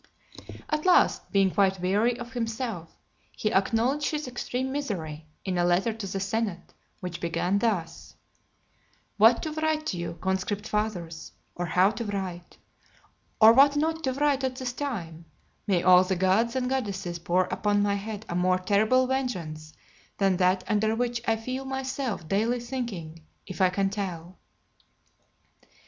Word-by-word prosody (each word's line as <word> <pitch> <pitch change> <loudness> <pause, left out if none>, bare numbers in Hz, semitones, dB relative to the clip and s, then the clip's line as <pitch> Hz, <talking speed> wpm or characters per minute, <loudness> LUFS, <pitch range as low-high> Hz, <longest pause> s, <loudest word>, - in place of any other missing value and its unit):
LXVII. - - -13
At 305 +1 -1
last, 360 - +3
being 195 -1 +3
quite 190 -1 +2
weary 210 +7 +1
of 240 -1 -8
himself, 225 -7 -4 0.4
he 215 - -1
acknowledged 235 +9 +1
his 300 -3 -3
extreme 250 +1 -3
misery, 165 - -4 0.2
in 185 -2 -1
a - - +3
letter 175 +6 +2
to 215 -2 -6
the 195 +1 -3
senate, 200 -2 -3 0.3
which 180 -2 -6
begun 175 +3 0
thus: 200 -7 -2 1.0
"What 225 +3 +5
to 315 - -3
write 310 0 -1
to 185 - -2
you, 170 -1 -5
Conscript 190 +2 -2
Fathers, 180 -7 -3 0.2
or 175 0 -3
how 185 +3 +4
to 230 +1 -5
write, 190 -4 -5 0.8
or 220 +1 +9
what 280 +3 +6
not 320 +2 0
to 260 - 0
write 280 0 +1
at 260 -1 -1
this 255 -1 -4
time, 175 - -5 0.4
may 185 -4 +2
all 185 0 +7
the 185 +1 -1
gods 190 +6 +2
and 255 -1 0
goddesses 200 -9 -3
pour 175 +2 +2
upon 205 +2 +1
my 205 0 +1
head 210 +1 -5
a - - -4
more 180 +1 +2
terrible 215 +7 +3
vengeance 175 - -3 0.5
than 195 -2 +2
that 185 0 +2
under 220 0 +1
which 240 0 -1
I 225 - +3
feel 255 +4 -5
myself 265 - -3
daily 225 +7 +1
sinking, 220 -11 -6 0.2
if 190 0 -6
I 185 - +5
can 195 +1 0
tell." 185 -3 -5
205 Hz, 160 wpm, -27 LUFS, 185-245 Hz, 1.0 s, or